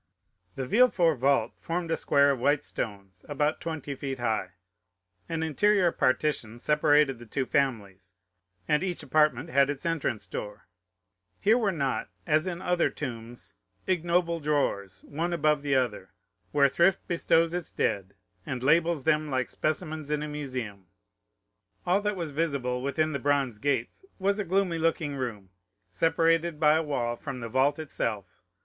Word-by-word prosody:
The 135 Hz, -, -3 dB
Villefort 175 Hz, -, +3 dB
vault 130 Hz, -3 st, +2 dB
formed 170 Hz, 0 st, -3 dB
a -, -, +3 dB
square 140 Hz, 0 st, +3 dB
of 130 Hz, -3 st, -3 dB
white 145 Hz, +2 st, +2 dB
stones, 100 Hz, -4 st, -6 dB
about 150 Hz, +1 st, 0 dB
twenty 160 Hz, -4 st, -4 dB
feet 135 Hz, 0 st, -5 dB
high; 110 Hz, -6 st, -1 dB, 0.8 s
an 165 Hz, -1 st, -2 dB
interior 180 Hz, +3 st, +3 dB
partition 130 Hz, -6 st, 0 dB
separated 150 Hz, -2 st, +3 dB
the 120 Hz, -, -12 dB
two 130 Hz, +4 st, -1 dB
families, 100 Hz, -9 st, -2 dB, 0.5 s
and 150 Hz, +1 st, +2 dB
each 180 Hz, -2 st, -2 dB
apartment 150 Hz, -1 st, +2 dB
had 140 Hz, 0 st, +4 dB
its 145 Hz, +3 st, -4 dB
entrance 155 Hz, -9 st, -1 dB
door. 105 Hz, 0 st, -7 dB, 0.7 s
Here 215 Hz, +3 st, +4 dB
were 220 Hz, -5 st, +1 dB
not, 140 Hz, -7 st, -2 dB, 0.2 s
as 155 Hz, +2 st, +2 dB
in 175 Hz, -1 st, -4 dB
other 180 Hz, -1 st, +2 dB
tombs, 120 Hz, -3 st, -7 dB, 0.3 s
ignoble 170 Hz, -1 st, +1 dB
drawers, 100 Hz, -, -1 dB
one 165 Hz, +4 st, -3 dB
above 150 Hz, -3 st, +2 dB
another, 125 Hz, -9 st, 0 dB, 0.4 s
where 140 Hz, -1 st, +5 dB
thrift 170 Hz, +7 st, +2 dB
bestows 165 Hz, -1 st, +2 dB
its 175 Hz, -3 st, -3 dB
dead 100 Hz, -1 st, -2 dB, 0.3 s
and 125 Hz, +4 st, -5 dB
labels 165 Hz, +1 st, +3 dB
them 155 Hz, 0 st, +1 dB
like 130 Hz, -2 st, -1 dB
specimens 155 Hz, -1 st, -3 dB
in 150 Hz, 0 st, -1 dB
a -, -, -4 dB
museum; 125 Hz, -10 st, -5 dB, 1.0 s
all 185 Hz, +3 st, +2 dB
that 210 Hz, 0 st, -1 dB
was 170 Hz, -5 st, -4 dB
visible 140 Hz, -5 st, -1 dB
within 155 Hz, +4 st, 0 dB
the 140 Hz, -, -2 dB
bronze 135 Hz, -5 st, 0 dB
gates 135 Hz, -, -1 dB
was 200 Hz, +2 st, 0 dB
a -, -, 0 dB
gloomy 185 Hz, -2 st, +1 dB
looking 160 Hz, -3 st, 0 dB
room, 110 Hz, -8 st, -5 dB, 0.4 s
separated 165 Hz, 0 st, +2 dB
by 150 Hz, -1 st, +5 dB
a 160 Hz, -, +3 dB
wall 125 Hz, -6 st, -2 dB
from 130 Hz, +1 st, -6 dB
the 115 Hz, -, -5 dB
vault 135 Hz, +5 st, +2 dB
itself. 105 Hz, -, -4 dB
145 Hz, 155 wpm, -28 LUFS, 125-165 Hz, 1.0 s, where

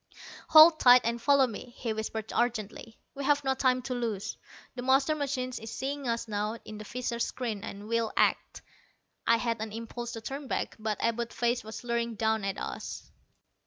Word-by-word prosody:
"Hold 315 Hz, 0 st, +9 dB
tight 250 Hz, 0 st, +8 dB
and 235 Hz, 0 st, -1 dB
follow 280 Hz, 0 st, +5 dB
me," 240 Hz, +1 st, -8 dB
he 230 Hz, -3 st, -2 dB
whispered 220 Hz, 0 st, -4 dB
urgently, 230 Hz, -1 st, -2 dB, 0.2 s
"we've 285 Hz, +1 st, +1 dB
no 265 Hz, -1 st, +2 dB
time 255 Hz, -1 st, +1 dB
to 260 Hz, 0 st, -3 dB
lose. 225 Hz, -5 st, -3 dB, 0.4 s
The 250 Hz, -, -6 dB
master 270 Hz, +4 st, +3 dB
machine 275 Hz, -4 st, -2 dB
is 225 Hz, -, -7 dB
seeing 275 Hz, +2 st, -4 dB
us 230 Hz, 0 st, -1 dB
now 210 Hz, +1 st, -2 dB
in 215 Hz, -1 st, -8 dB
the -, -, -6 dB
visor 240 Hz, +1 st, -4 dB
screen, 230 Hz, -3 st, -3 dB
and 200 Hz, +1 st, -7 dB
will 230 Hz, -1 st, 0 dB
act." -, -, +1 dB, 0.6 s
I 230 Hz, -, +5 dB
had 230 Hz, -1 st, -2 dB
an 220 Hz, -1 st, -4 dB
impulse 230 Hz, +2 st, -6 dB
to 225 Hz, -, -6 dB
turn 275 Hz, +4 st, -6 dB
back, -, -, -2 dB
but 215 Hz, -1 st, -2 dB
Abud's 235 Hz, 0 st, -1 dB
face 240 Hz, +1 st, 0 dB
was 220 Hz, +2 st, -8 dB
leering 235 Hz, -1 st, -1 dB
down 220 Hz, 0 st, 0 dB
at 195 Hz, 0 st, -2 dB
us. -, -, -6 dB
235 Hz, 185 wpm, -29 LUFS, 220-255 Hz, 0.6 s, Hold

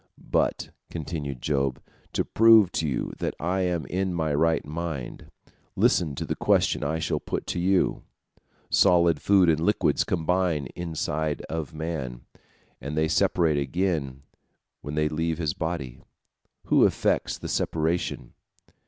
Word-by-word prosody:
"But," -, -, -1 dB, 0.2 s
continued 75 Hz, -5 st, -5 dB
Job, 70 Hz, -3 st, 0 dB, 0.3 s
"to -, -, 0 dB
prove 110 Hz, -4 st, +6 dB
to 80 Hz, -, -1 dB
you 65 Hz, -, -2 dB
that -, -, -2 dB
I 90 Hz, +4 st, -1 dB
am 90 Hz, -3 st, -1 dB
in 95 Hz, -1 st, -2 dB
my 80 Hz, -3 st, 0 dB
right 80 Hz, +3 st, +2 dB
mind, 80 Hz, -4 st, -5 dB, 0.5 s
listen 75 Hz, -6 st, +2 dB
to -, -, -4 dB
the -, -, -2 dB
question -, -, +2 dB
I 80 Hz, +3 st, -1 dB
shall 80 Hz, -, -1 dB
put -, -, -4 dB
to -, -, -3 dB
you. 95 Hz, +1 st, +1 dB, 0.7 s
Solid 85 Hz, -5 st, +4 dB
food 95 Hz, -3 st, +4 dB
and 80 Hz, -2 st, +3 dB
liquids 80 Hz, -, +2 dB
combine 90 Hz, -3 st, 0 dB
inside 80 Hz, -3 st, -2 dB
of 80 Hz, -3 st, -4 dB
man, 75 Hz, -7 st, -4 dB, 0.6 s
and 75 Hz, +2 st, -5 dB
they 80 Hz, 0 st, +2 dB
separate 80 Hz, -2 st, +2 dB
again 70 Hz, -3 st, -2 dB, 0.6 s
when 75 Hz, +1 st, -6 dB
they 75 Hz, 0 st, +2 dB
leave 80 Hz, +1 st, -1 dB
his 80 Hz, -4 st, -1 dB
body. 80 Hz, -7 st, -4 dB, 0.6 s
Who -, -, +4 dB
effects -, -, 0 dB
the -, -, -7 dB
separation?" 80 Hz, -6 st, -1 dB
80 Hz, 140 wpm, -26 LUFS, 75-85 Hz, 0.7 s, prove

